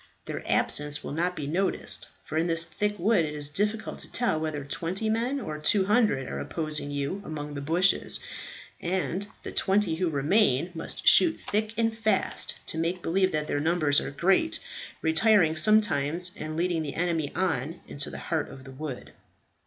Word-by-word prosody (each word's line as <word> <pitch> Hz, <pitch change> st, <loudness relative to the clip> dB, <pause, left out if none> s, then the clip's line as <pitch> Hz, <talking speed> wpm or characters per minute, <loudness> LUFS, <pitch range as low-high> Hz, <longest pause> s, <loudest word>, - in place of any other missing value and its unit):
Their -, -, -5 dB
absence 150 Hz, 0 st, +1 dB
will -, -, -6 dB
not 175 Hz, +4 st, -1 dB
be 150 Hz, -, -4 dB
noticed, 180 Hz, +7 st, +2 dB, 0.2 s
for -, -, -7 dB
in 165 Hz, +2 st, +1 dB
this 165 Hz, 0 st, +3 dB
thick 205 Hz, +5 st, -2 dB
wood 200 Hz, -1 st, +3 dB
it 150 Hz, -1 st, -4 dB
is 145 Hz, -1 st, +2 dB
difficult 210 Hz, +7 st, -1 dB
to -, -, -7 dB
tell 240 Hz, -10 st, +1 dB
whether 155 Hz, -3 st, -3 dB
twenty 185 Hz, +9 st, -2 dB
men 240 Hz, +5 st, 0 dB
or 155 Hz, -, -5 dB
two 190 Hz, +6 st, +3 dB
hundred 205 Hz, -, +2 dB
are -, -, -4 dB
opposing 155 Hz, -3 st, -3 dB
you 145 Hz, +7 st, -3 dB
among 150 Hz, -4 st, -6 dB
the 140 Hz, -, -5 dB
bushes; 170 Hz, +7 st, +2 dB, 0.6 s
and 185 Hz, +1 st, -2 dB, 0.2 s
the -, -, -6 dB
twenty 195 Hz, -4 st, +1 dB
who 180 Hz, -1 st, 0 dB
remain 160 Hz, -, +2 dB
must 165 Hz, -, -5 dB
shoot 330 Hz, -3 st, +6 dB
thick 215 Hz, +2 st, -2 dB
and 225 Hz, -1 st, +1 dB
fast 225 Hz, -, 0 dB
to 160 Hz, -, -2 dB
make 170 Hz, +2 st, -2 dB
believe 185 Hz, +3 st, +2 dB
that 150 Hz, -1 st, -1 dB
their 145 Hz, -, -1 dB
numbers 155 Hz, -2 st, +2 dB
are -, -, -4 dB
great, 195 Hz, -, +1 dB, 0.4 s
retiring 160 Hz, 0 st, +4 dB
sometimes, 175 Hz, -3 st, +3 dB
and 155 Hz, -4 st, -6 dB
leading 170 Hz, -1 st, 0 dB
the 145 Hz, -3 st, -5 dB
enemy 165 Hz, -4 st, -1 dB
on 165 Hz, -3 st, -1 dB
into 145 Hz, -, -2 dB
the -, -, -7 dB
heart 160 Hz, -3 st, -2 dB
of 130 Hz, -, -11 dB
the 135 Hz, -, -11 dB
wood." 135 Hz, -1 st, -7 dB
165 Hz, 180 wpm, -27 LUFS, 150-205 Hz, 0.6 s, shoot